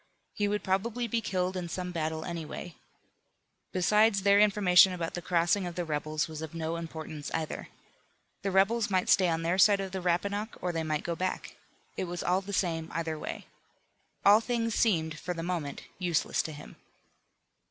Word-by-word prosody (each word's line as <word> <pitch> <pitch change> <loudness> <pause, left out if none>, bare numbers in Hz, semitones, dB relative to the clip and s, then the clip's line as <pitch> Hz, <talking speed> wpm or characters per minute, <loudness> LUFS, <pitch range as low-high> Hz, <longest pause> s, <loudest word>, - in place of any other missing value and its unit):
He 205 - 0
would 210 0 -1
probably 225 +6 -1
be 230 +1 0
killed 185 -3 -1
in 180 -2 -4
some 180 +1 -4
battle 160 -1 -2
anyway. 170 0 -6 1.0
Besides, 210 +2 +3
their 200 0 +5
information 195 -3 +6
about 170 -2 -3
the 175 - -4
crossing 175 +2 +1
of 175 - -6
the 175 -1 -2
rebels 155 0 -1
was 155 -1 -7
of 160 0 -7
no 165 0 -2
importance 160 -3 -6
either. 160 -1 -4 0.7
The 195 - -1
rebels 200 +4 +3
might 185 -2 +1
stay 185 -3 +5
on 165 0 -1
their 175 +3 +1
side 200 +1 +6
of 195 -1 -4
the 190 0 -4
Rappahannock, 200 +5 -1
or 180 - -1
they 165 -1 -2
might 155 -1 -2
go 170 - -2
back. 185 +2 -3 0.4
It - - -1
was 175 0 -5
all 180 +2 +2
the 200 +1 -8
same 165 -4 -1
either 160 -2 -3
way. - - -6 0.8
All 205 +2 +7
things 230 -1 -1
seemed, 160 -10 +1
for 180 - -4
the 165 - -4
moment, 165 -5 -3 0.2
useless 175 -4 +1
to 160 - -6
him. 150 0 -11
180 Hz, 185 wpm, -29 LUFS, 165-200 Hz, 1.0 s, All